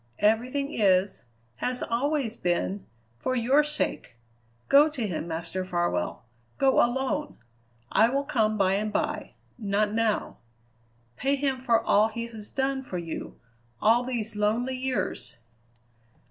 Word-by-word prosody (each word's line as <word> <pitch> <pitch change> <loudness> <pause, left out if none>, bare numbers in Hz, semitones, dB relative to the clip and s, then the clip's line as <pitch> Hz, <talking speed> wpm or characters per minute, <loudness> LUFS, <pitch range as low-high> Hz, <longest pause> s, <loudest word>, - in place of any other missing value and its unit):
Everything 250 +7 +1
is, 190 - +2 0.3
has 250 0 -1
always 255 0 -1
been, 100 - -1 0.3
for 255 - -1
your 260 +5 +4
sake. 300 - -1 0.5
Go 290 +3 +6
to 260 -7 -3
him, 170 -4 -3
Master 165 +3 -3
Farwell 175 - -1 0.3
go 270 -1 +4
alone. 265 +5 -1 0.5
I 225 +2 +5
will 275 +2 0
come 215 -5 +1
by 190 -2 +3
and 210 +2 -1
by; - - -2 0.2
not 205 0 0
now. 225 -1 0 0.8
Pay 275 +2 +1
him 270 -2 -1
for 235 -3 +3
all 210 +2 +3
he 230 +1 -5
has 220 -3 -8
done 270 0 -1
for 190 -8 -5
you 165 -2 -6 0.4
all 230 +3 +4
these 235 -4 -3
lonely 225 +5 0
years!" 255 - -2
230 Hz, 130 wpm, -27 LUFS, 200-265 Hz, 0.8 s, Go